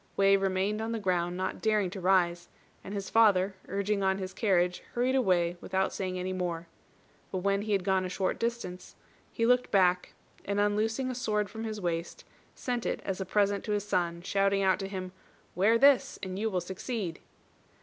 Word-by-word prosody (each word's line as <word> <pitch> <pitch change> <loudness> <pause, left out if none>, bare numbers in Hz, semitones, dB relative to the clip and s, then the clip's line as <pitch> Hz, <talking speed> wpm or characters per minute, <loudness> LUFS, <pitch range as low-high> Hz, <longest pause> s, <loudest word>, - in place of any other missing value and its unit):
Wei 195 0 +5
remained 195 +2 0
on 225 +1 -2
the 225 - -2
ground, 180 -3 0
not 185 0 -3
daring 210 -4 +1
to 195 - -6
rise; 175 -2 +2 0.3
and 195 - -8
his 200 -1 -4
father, 200 -4 +4
urging 200 +1 -1
on 190 0 +2
his 185 -1 -5
carriage, 180 -4 +1
hurried 250 +2 +1
away 180 -9 +2
without 190 0 -1
saying 185 -1 -3
any 185 +1 -3
more. 175 -2 -3 0.7
But 185 -1 -3
when 200 0 +2
he 210 0 -1
had 195 -2 +1
gone 190 0 +2
a 185 - -3
short 185 0 -1
distance, 230 -6 -4 0.4
he 230 - 0
looked 250 +1 +3
back, 180 -2 +2 0.3
and 200 0 -1
unloosing 220 +5 +1
a - - -3
sword 210 -5 -1
from 225 0 -5
his 215 -1 -4
waist, 170 -2 -3 0.3
sent 245 -2 -2
it - - -2
as 195 0 -3
a - - -2
present 200 +1 +1
to 210 - -1
his 205 0 -2
son, 170 -3 -1
shouting 195 +1 +1
out 190 -1 +3
to 195 - -3
him, 185 -2 -5 0.4
"Wear 210 +5 +4
this 275 +1 +4
and 190 0 -4
you 220 +1 0
will 185 -3 -1
succeed." 190 0 -4
195 Hz, 195 wpm, -29 LUFS, 185-210 Hz, 0.7 s, Wei